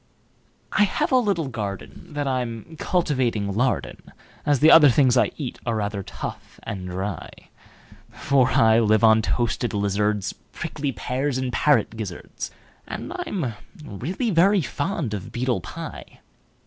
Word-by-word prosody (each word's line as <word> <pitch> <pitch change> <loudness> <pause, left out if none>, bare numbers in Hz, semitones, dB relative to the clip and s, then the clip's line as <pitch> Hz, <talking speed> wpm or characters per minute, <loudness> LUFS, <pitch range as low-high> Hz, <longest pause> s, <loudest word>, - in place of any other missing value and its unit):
I 210 - +4
have 195 - -1
a 260 - +5
little 200 - +1
gardenThat 125 - -5
I'm 125 +2 -3
cultivating 125 - 0
lard 125 +3 +1
in, - - -11 0.5
As 145 -3 +3
the 155 +4 +7 0.2
things 130 -1 +4
I - - +3
eat 135 -6 -5
are 115 -2 -1
rather 105 -1 -2
tough - - -8
and 95 -5 -5
dry; 95 -1 -4 0.8
For 130 -3 +2
I 110 0 +5
live 110 -1 +3
on 110 0 +6
toasted 120 0 -1
lizards, 100 0 0 0.2
Prickly 145 -1 -3
pears, 130 +2 -2
and 130 -1 -2
parrot 120 -6 +2
gizzards, 100 -6 -6 0.4
And - - -6
I'm 145 - -3 0.3
really 170 - -3
very 190 +3 +4
fond 145 - -2
of 105 +2 -5
beetle 120 -5 -1
pie. - - -9
120 Hz, 135 wpm, -24 LUFS, 105-145 Hz, 0.8 s, the